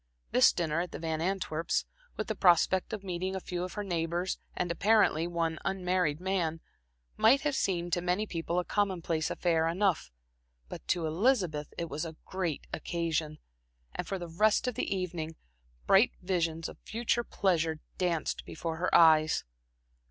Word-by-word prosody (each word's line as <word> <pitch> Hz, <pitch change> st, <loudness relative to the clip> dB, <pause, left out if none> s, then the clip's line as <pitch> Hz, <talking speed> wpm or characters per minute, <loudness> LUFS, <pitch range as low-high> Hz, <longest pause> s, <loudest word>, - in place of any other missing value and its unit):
This 125 Hz, -, +6 dB
dinner 165 Hz, -2 st, -1 dB
at 180 Hz, -, -5 dB
the -, -, -5 dB
Van 160 Hz, -1 st, -2 dB
Antwerps', 170 Hz, -3 st, -1 dB, 0.3 s
with -, -, -2 dB
the -, -, -2 dB
prospect 185 Hz, +2 st, +3 dB
of 210 Hz, -3 st, -5 dB
meeting 185 Hz, 0 st, -3 dB
a -, -, -2 dB
few 180 Hz, -1 st, -4 dB
of 180 Hz, -, -5 dB
her 210 Hz, -, -3 dB
neighbors 175 Hz, 0 st, -2 dB, 0.2 s
and 175 Hz, -1 st, -1 dB
apparently, 195 Hz, -3 st, +3 dB
one 165 Hz, -2 st, -1 dB
unmarried 180 Hz, -5 st, 0 dB
man, 180 Hz, -4 st, -1 dB, 0.6 s
might 255 Hz, +6 st, +5 dB
have 295 Hz, -2 st, 0 dB
seemed 175 Hz, -7 st, -1 dB
to 175 Hz, -, +2 dB
many 180 Hz, +4 st, 0 dB
people 170 Hz, -2 st, -3 dB
a 180 Hz, -, +1 dB
commonplace 175 Hz, -6 st, 0 dB
affair 165 Hz, -2 st, +1 dB
enough; 185 Hz, 0 st, +1 dB, 0.6 s
but -, -, -9 dB
to 175 Hz, -3 st, +1 dB
Elizabeth 170 Hz, -, +1 dB
it 170 Hz, -, -2 dB
was 155 Hz, 0 st, -4 dB
a 160 Hz, -2 st, -6 dB
great 180 Hz, -6 st, -3 dB
occasion, 160 Hz, -2 st, -2 dB, 0.6 s
and -, -, -4 dB
for 195 Hz, -, -2 dB
the 175 Hz, -1 st, -6 dB
rest 210 Hz, +8 st, +2 dB
of 250 Hz, -, 0 dB
the -, -, -3 dB
evening, 175 Hz, -4 st, -3 dB, 0.5 s
bright 195 Hz, +5 st, +5 dB
visions 165 Hz, -3 st, -1 dB
of -, -, -11 dB
future 235 Hz, +1 st, -1 dB
pleasure 165 Hz, -8 st, 0 dB, 0.2 s
danced 175 Hz, -3 st, -1 dB
before 160 Hz, 0 st, -5 dB
her 180 Hz, +2 st, 0 dB
eyes. 155 Hz, -2 st, +6 dB
175 Hz, 165 wpm, -30 LUFS, 165-190 Hz, 0.6 s, This